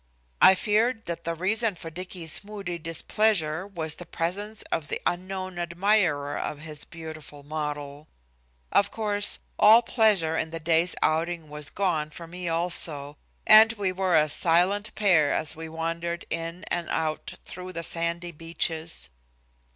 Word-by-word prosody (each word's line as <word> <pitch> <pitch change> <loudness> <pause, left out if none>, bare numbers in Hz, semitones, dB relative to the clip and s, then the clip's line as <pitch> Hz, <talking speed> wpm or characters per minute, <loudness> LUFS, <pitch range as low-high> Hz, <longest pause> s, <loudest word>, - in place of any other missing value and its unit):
I 190 - +9
feared 225 +4 +1
that 170 0 -5
the 170 0 -1
reason 205 +4 +1
for 165 -1 -9
Dicky's 180 0 -2
moody 200 -4 -6
displeasure 165 +1 +1
was 160 -6 -3
the 175 - -9
presence 205 +7 -2
of 155 -3 -1
the - - -2
unknown 185 0 -3
admirer 170 -4 +1
of 150 - -3
his 150 0 -4
beautiful 155 -3 -10
model. 150 0 -5 0.6
Of 200 - +3
course, 205 -2 0 0.2
all 220 +3 +8
pleasure 200 -9 +2
in 160 - -1
the 165 0 -5
day's 165 +2 +2
outing 160 0 0
was 150 -1 -2
gone 170 -6 -1
for 170 +2 -9
me 175 +1 -5
also, 165 -4 +1 0.3
and 220 +1 +8
we 200 -4 -1
were 185 -1 +1
a 155 -1 +5
silent 180 +7 +2
pair 175 -8 +4
as 155 - -1
we 160 0 -7
wandered 165 +1 -3
in 165 +2 -4
and 175 -1 -2
out 155 -1 -2
through 185 0 -8
the 170 0 -4
sandy 170 +1 -1
beaches. 165 - -2
170 Hz, 150 wpm, -26 LUFS, 160-190 Hz, 0.6 s, I